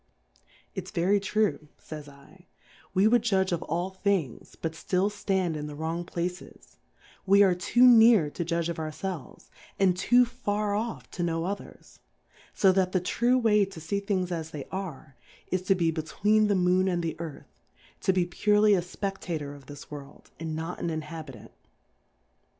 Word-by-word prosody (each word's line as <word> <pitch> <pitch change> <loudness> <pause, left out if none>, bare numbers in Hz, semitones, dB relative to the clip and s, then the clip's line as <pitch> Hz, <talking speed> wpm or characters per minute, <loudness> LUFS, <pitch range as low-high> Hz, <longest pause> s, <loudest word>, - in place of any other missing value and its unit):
Its 185 -1 -6
very 190 +4 +2
true, 200 -5 0
fays 150 -2 -9 0.4
/, - - -29
we 190 +3 +5
would 240 +1 +4
judge 190 -5 +1
of 170 - -1
all 175 +4 -2
Things, 190 - -2
but 165 - -2
ftill 185 +5 0
ftand 190 -5 -1
in 150 0 -4
the 150 - -7
wrong 165 +3 -3
Places; 175 +1 -6 0.5
we 200 +1 +7
are 190 -2 +4
too 215 +7 +2
near 225 -9 +7
to 170 - -3
judge 170 0 -1
of 170 -1 -4
our 155 -1 -3
felves, 165 0 -7 0.3
and 190 -2 +4
too 245 +7 +4
far 210 -4 -2
off 225 +3 -3
to 180 - -5
knov/ 165 0 -1
others: 200 +1 -8 0.6
So 195 - +5
that 185 -1 +1
the 185 - +3
true 240 +8 +1
way 215 -4 +4
to 195 -4 -10
fee 165 +6 -2
Things 190 -3 -1
as 160 -2 -3
they 150 -4 -7
are, 175 -9 -6 0.3
is 185 - +1
to 195 - +5
be 170 -3 +1
between 205 +7 +1
the 205 - +2
Moon 185 +1 +3
and 175 -2 0
the 165 - -2
Earth, 165 -4 -9 0.4
to - - +2
be 185 -2 +1
purely 210 +4 +3
a 185 - +3
Speftator 175 -5 -5
of 140 -2 -15
this 145 0 -11
World, 145 -1 -11
and 160 -1 -4
not 165 +3 -5
an 170 - -2
In 160 -1 -2
habitant. 150 -7 -9
180 Hz, 180 wpm, -27 LUFS, 160-200 Hz, 0.6 s, we